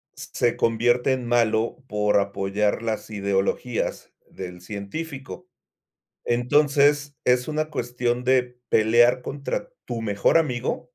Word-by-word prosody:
s - - -9
se 120 - +1
convierte 120 +3 +2
en 125 -2 -1
malo 115 -1 +1
por 105 0 +1
apoyar 100 +2 -1
las 110 -1 -3
ideologías 100 +4 -2 0.2
del 90 -1 -8
científico, 135 - -7 0.8
entonces 145 +3 +2
es 125 +2 +2
una 155 0 -2
cuestión 120 -2 -2
de 125 -1 +1
pelear 120 +3 +4
contra 145 +6 -4
tu 120 -2 -4
mejor 105 +8 +2
amigo. 125 -6 -2
120 Hz, 115 wpm, -24 LUFS, 110-135 Hz, 0.8 s, pelear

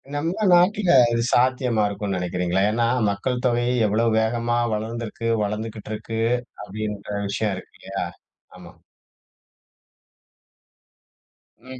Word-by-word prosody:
நம்ம 170 +9 -1
நாட்டில 180 +1 +4 0.2
இது 115 - +1
சாத்தியமா 125 -3 +2
இருக்கும்ன்னு 100 -2 -3
நினைக்கிறீங்களா? 90 +1 -1
ஏன்னா, 115 +1 +1 0.2
மக்கள் 125 +5 -2
தொகை 120 -1 +2 0.2
எவ்வளவு 110 +2 +2
வேகமா 120 +1 0 0.2
வளர்ந்துக்கு, 115 +1 -4 0.2
வளர்ந்துகிட்டு 105 +1 -5
இருக்கு 110 +1 -5 0.4
அப்டின்ற 105 0 -5 0.2
விஷயம் 105 0 -1
இருக்கு. - - -12
இல்லையா? - - -4 0.5
ஆமா. 90 -1 -12 2.9
ம். 130 +1 -11
115 Hz, 100 wpm, -23 LUFS, 105-120 Hz, 2.9 s, நாட்டில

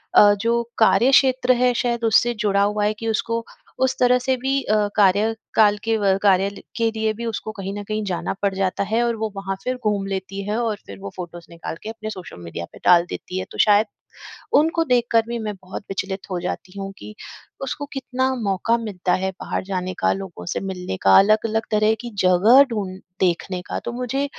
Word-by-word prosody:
अ, 205 0 +8
जो 235 +1 +2 0.2
कार्यक्षेत्र 255 +4 +4
है 250 -1 +4
शायद 235 -1 -1
उससे 235 +2 +4
जुड़ा 200 -2 +2
हुआ 210 +1 0
है 210 - +1
कि 225 +1 -6
उसको 230 +1 -1 0.4
उस 260 0 +2
तरह 250 0 +5
से 260 +1 0
भी 270 +2 0
अ, 215 - +1 0.2
कार्य 205 +2 +4 0.2
काल 210 -2 +5
के 225 0 +1
व 195 -2 +2
कार्यालय 195 0 +2
के 230 -1 +1
लिए 220 0 0
भी 235 +2 -6
उसको 220 -1 -4
कहीं 195 -2 -6
न 205 0 -5
कहीं 215 +1 -3
जाना 180 -3 -2
पड़ 200 -1 +1
जाता 190 0 0
है। 220 +4 0
और 235 -1 0
वो 220 0 -2
वहाँ 195 0 -3
फिर 255 - -1
घूम 205 -2 0
लेती 195 0 -4
है 210 - 0
और 230 -3 0
फिर - - -10
वो 200 0 -6
फ़ोटोस 175 -1 -8
निकाल 170 -1 -7
के 215 - -5
अपने 220 -1 -6
सोशल 185 - -9
मीडिया 85 0 -6
पे - - -14
डाल 175 -1 +6
देती 185 - -5
है। 185 - -4
तो - - -9
शायद 210 0 +5 0.7
उनको 325 +2 +2
देखकर 240 -3 +3
भी 235 0 -3
मैं 215 -2 -4
बहुत 185 - -7
विचलित 195 0 -4
हो 180 - -1
जाती 185 +2 -5
हूँ 195 0 -5
कि 215 - -10 0.5
उसको 270 +2 -3
कितना 260 -1 -1
मौका 200 +3 +1
मिलता 195 -5 -2
है 190 +1 -1
बाहर - - -3
जाने 185 -1 -3
का, - - +2
लोगों 195 -3 -6
से - - -2
मिलने 180 - -4
का, 95 -1 +6
अलग-अलग 215 +2 +3
तरह 215 +1 +3
की 240 -1 -6
जगह 195 +9 +6
ढूँढ 195 -5 -3 0.2
देखने 180 0 0
का। - - -3
तो - - -3
मुझे 250 +3 -2
210 Hz, 210 wpm, -22 LUFS, 190-235 Hz, 0.7 s, अ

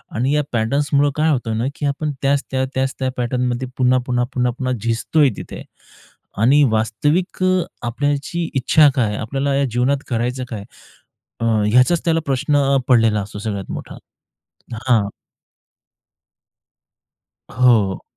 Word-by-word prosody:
आणि 130 +5 0
या 150 - +2
पॅटर्न्समुळे 140 +5 +1
काय 155 +1 +2
होतं 120 -5 -1
ना 115 - -1
की 145 - -4
आपण 150 +1 -2
त्याच 140 +1 +2
त्या, 130 0 0
त्याच 130 0 -1
त्या 130 -1 0
पॅटर्नमध्ये 125 +1 -1
पुन्हा, 130 0 +3
पुन्हा, 125 -1 +1
पुन्हा, 125 -1 +1
पुन्हा 130 -1 -1
झिजतोय 120 +6 +2
तिथे. - - -8 0.8
आणि 140 +6 +5
वास्तविक 145 - 0
अ, 185 -1 +2 0.2
आपल्याची 145 +6 -2
इच्छा 145 +3 +5
काय? 110 -5 0
आपल्याला 135 +5 -2
या 140 0 +2
जीवनात 125 +4 +1
करायचं 125 +2 -1
काय? 105 -3 -6 0.8
अ, - - -1
ह्याचाचं 115 +8 +3
त्याला 165 -1 +2
प्रश्न 140 +2 +1
अ, 140 -1 +3
पडलेला 115 -4 +4
असतो 105 +1 -8
सगळ्यात 100 -3 -4
मोठा. - - -7 0.8
हां. 115 -3 +1 2.4
हो. 115 -5 +2
130 Hz, 135 wpm, -19 LUFS, 115-140 Hz, 2.4 s, आणि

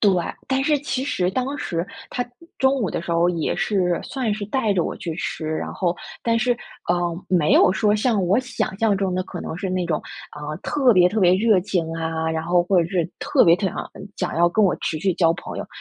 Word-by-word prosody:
对， 205 - +5 0.4
但 270 0 +1
是 295 -1 +3
其 270 -2 -3
实 180 -9 0
当 260 +6 -2
时 170 -5 -2 0.2
她 245 - -2 0.3
中 265 0 +3
午 195 - 0
的 - - -3
时 170 - -3
候 170 +1 +3
也 170 -3 -1
是 180 -4 0
算 255 -5 -2
是 205 -1 -4
带 220 -3 +1
着 180 - +1
我 - - -4
去 165 -2 -5
吃， 160 -1 -4
然 155 0 -2
后， 175 -2 0 0.3
但 230 -1 +2
是， 245 +1 +1 0.3
呃， 175 -1 +1
没 170 -5 +3
有 - - +6
说 205 +2 +2
像 215 -3 +1
我 195 +6 +3
想 250 -6 -3
象 215 -3 +2
中 190 -2 -1
的 185 - 0
可 - - -7
能 - - -5
是 190 0 -3
那 185 -1 -1
种， 160 -3 -1 0.3
呃， 150 +1 -5
特 265 -5 +3
别 180 -1 +6
特 210 +4 0
别 180 -1 +5
热 210 -1 +4
情 180 -3 -1
啊， 160 0 -2
然 160 0 -2
后， 175 +1 +3
或 180 -1 +3
者 165 - -4
是 175 -3 0
特 - - +3
别 170 -1 +7
想 190 0 -1
要 - - -4 0.3
想 180 -3 -2
要 175 +1 +5
跟 215 +4 +2
我 190 - +3
持 155 - -2
续 190 +1 +2
交 165 -1 +3
朋 - - -7
友。 - - -5
185 Hz, 255 characters per minute, -22 LUFS, 170-220 Hz, 0.4 s, 别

